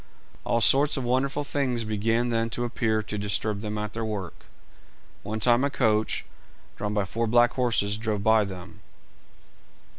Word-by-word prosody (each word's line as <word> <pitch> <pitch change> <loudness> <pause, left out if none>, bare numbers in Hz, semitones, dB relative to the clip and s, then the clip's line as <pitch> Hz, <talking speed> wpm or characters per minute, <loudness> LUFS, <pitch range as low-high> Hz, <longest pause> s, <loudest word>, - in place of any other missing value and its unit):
All 115 - +1
sorts 145 +5 +4
of 135 - -2
wonderful 135 +4 0
things 130 -5 -1
began 115 +3 0
then 115 -1 0
to 120 - -1
appear 110 -2 0
to 105 - -5
disturb 105 0 -1
them 105 -1 -4
at 105 0 -4
their 115 - -3
work. 105 -5 -5 0.7
One 110 +2 -4
time 120 +3 +3
a 140 - +2
coach, 110 -5 +1 0.5
drawn 105 0 -3
by 105 -2 +1
four 115 +4 -2
black 120 +1 +4
horses, 110 -5 +1
drove 110 -2 -2
by 110 -1 +4
them. 95 +1 -9
110 Hz, 160 wpm, -26 LUFS, 105-120 Hz, 0.7 s, sorts